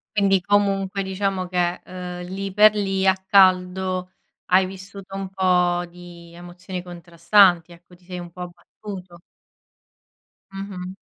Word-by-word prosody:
Quindi 195 -2 +3
comunque 195 0 +1
diciamo 190 -1 -2
che, 180 -1 -1
ehm, 180 -1 -7
lì 195 +1 -5
per 210 +1 +6
lì 195 -2 0
a 190 - +5
caldo, 185 -1 +2 0.4
hai 185 +1 +4
vissuto 190 +1 -10
un 195 -1 -5
po' 180 -2 +1
di 170 -1 -13
emozioni 180 +1 -8
contrastanti 175 +1 +2
ecco, 175 +1 -17
ti 180 - -26
sei 180 0 -7
un 175 0 -8
po' 180 +1 -11
abbattuto. 180 +1 -10 1.3
Mh-mh. 190 -2 -7
185 Hz, 130 wpm, -22 LUFS, 175-195 Hz, 1.3 s, per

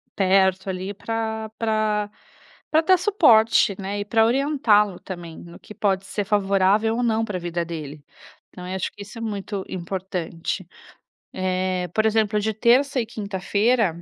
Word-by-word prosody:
Perto, 190 0 +2
ali, 190 +2 -4
pra 220 0 -4
pra 215 -2 0 0.6
pra 315 - +4
dar 370 +3 +4
suporte, 235 - +4
né, 200 +1 -4
e - - -2
pra 225 +2 +3
orientá-lo 230 -6 +2
também 170 -3 -8
no 170 0 -12
que 210 - -13
pode 195 -2 0
ser 195 +2 -3
favorável 200 +2 +2
ou 245 - -1
não 225 -2 +1
pra 210 -4 -3
vida 170 -1 -3
dele. 155 -3 -7 0.5
Então, 180 - -11
acho 185 +1 -3
que 205 - -10
isso 210 +3 -11
é - - -7
muito 205 -3 -4
importante. 180 -1 -4 0.7
Eh, 185 -1 -1
por 220 - +1
exemplo 215 -1 +2
de 220 +1 -1
terça 255 +5 +3
e - - -3
quinta-feira, 205 -2 0
205 Hz, 155 wpm, -23 LUFS, 185-220 Hz, 0.7 s, pra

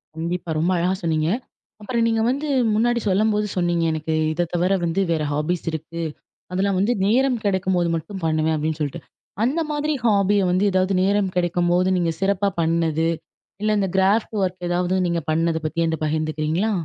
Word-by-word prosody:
கண்டிப்பா. 170 +2 -3
ரொம்ப 170 +4 +1
அழகா 180 +2 +1
சொன்னீங்க. 160 -1 +1 0.5
அப்புறம் 230 +2 0
நீங்க 225 -1 +1
வந்து 280 +4 -1 0.3
முன்னாடி 235 +2 +2
சொல்லும்போது 210 +2 +2
சொன்னீங்க, 175 -1 +1
எனக்கு 155 0 -2 0.2
இதை 175 +2 0
தவிர 180 +2 +2
வந்து 170 +3 0
வேற 160 -2 0
ஹாஃபிஸ் 155 +5 -2
இருக்கு. 160 +2 -5 0.5
அதெல்லாம் 190 +1 0
வந்து 210 +6 +2
நேரம் 250 +3 +2
கிடைக்கும்போது 185 -3 +1
மட்டும் 175 +4 -6
பண்ணுவேன், 160 0 +1
அப்பிடின்னு 155 +1 -2
சொல்ட்டு. 145 -2 -3 0.4
அந்த 280 +8 +1
மாதிரி 300 +1 -1
ஹாஃபிய 200 -2 +3
வந்து 185 +2 +2
எதாவது 185 +1 +1
நேரம் 195 -1 +1
கிடைக்கும்போது 175 +1 +2
நீங்க 170 -2 +1
சிறப்பா 200 +1 +2
பண்ணது, 165 -1 +1 0.5
இல்ல 215 0 +2
இந்த 195 -1 0
கிராஃப்ட் 205 +4 +2
ஒர்க் 180 -1 -3
எதாவது 180 +1 +1
நீங்க 170 -1 -1
பண்ணது 165 +1 +1
பத்தி 165 +2 0
என்ட்ட 160 -1 -1
பகிர்ந்துக்கிறீங்களா? 155 +5 -1
180 Hz, 160 wpm, -22 LUFS, 165-200 Hz, 0.5 s, ஹாஃபிய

